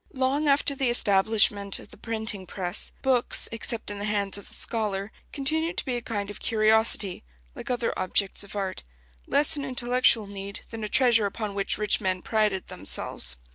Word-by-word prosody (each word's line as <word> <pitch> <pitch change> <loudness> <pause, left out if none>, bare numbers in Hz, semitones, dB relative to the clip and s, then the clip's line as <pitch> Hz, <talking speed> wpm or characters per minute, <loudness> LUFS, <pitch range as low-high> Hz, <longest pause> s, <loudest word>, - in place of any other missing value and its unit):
Long 270 +3 +1
after 280 0 +3
the 270 -2 0
establishment 205 -2 +3
of - - -12
the - - -12
printing 220 -4 -5
press, 180 -1 -4
books, 255 -2 +3
except 230 -1 -3
in 205 - -6
the 205 - -3
hands 205 -2 -1
of 200 - -3
the - - -9
scholar, 210 -2 0 0.2
continued 315 +4 -1
to - - +3
be 255 - -2
a 240 - -3
kind 205 -3 -4
of - - -10
curiosity, 220 -3 +2 0.3
like - - -8
other 245 -2 0
objects 190 +2 0
of 200 - -11
art: 195 - -3 0.4
less 295 +2 +4
an 285 - -4
intellectual 250 -3 +2
need 200 0 -7
than 225 -1 -6
a 210 - -3
treasure 235 -5 +3
upon 205 +1 -5
which 200 0 -1
rich 210 0 +1
men 185 -2 -1
prided 210 -4 0
themselves. 65 -9 0
215 Hz, 180 wpm, -26 LUFS, 200-245 Hz, 0.4 s, less